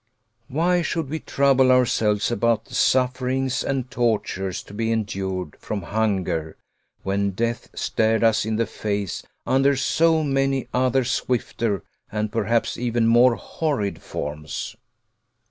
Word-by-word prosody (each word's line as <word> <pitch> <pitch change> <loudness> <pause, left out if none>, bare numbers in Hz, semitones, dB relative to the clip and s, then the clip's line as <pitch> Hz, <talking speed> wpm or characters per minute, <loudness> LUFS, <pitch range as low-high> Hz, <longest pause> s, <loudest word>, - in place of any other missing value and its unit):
Why 175 +5 +2
should 160 -4 -2
we 160 - -2
trouble 135 -3 +3
ourselves 110 -4 +2
about 115 -1 +1
the - - -15
sufferings 130 0 +1
and 130 -3 -2
tortures 105 -6 -1
to - - -14
be 115 +2 -1
endured 95 -6 -2
from 100 -3 -4
hunger 95 -7 -1 0.5
when 100 0 0
death 115 +3 -2
stared 110 +1 +1
us 115 -1 +4
in 110 0 -1
the 115 +1 +1
face 100 -4 -3 0.2
under 135 +1 +3
so 160 +4 +2
many 135 -2 0
other 130 +1 +2
swifter 115 -5 -1 0.3
and 105 0 -2
perhaps 115 +2 0
even 120 -1 +1
more 120 +1 +5
horrid 140 -12 -2
forms? 75 +8 -5
115 Hz, 130 wpm, -23 LUFS, 105-130 Hz, 0.5 s, more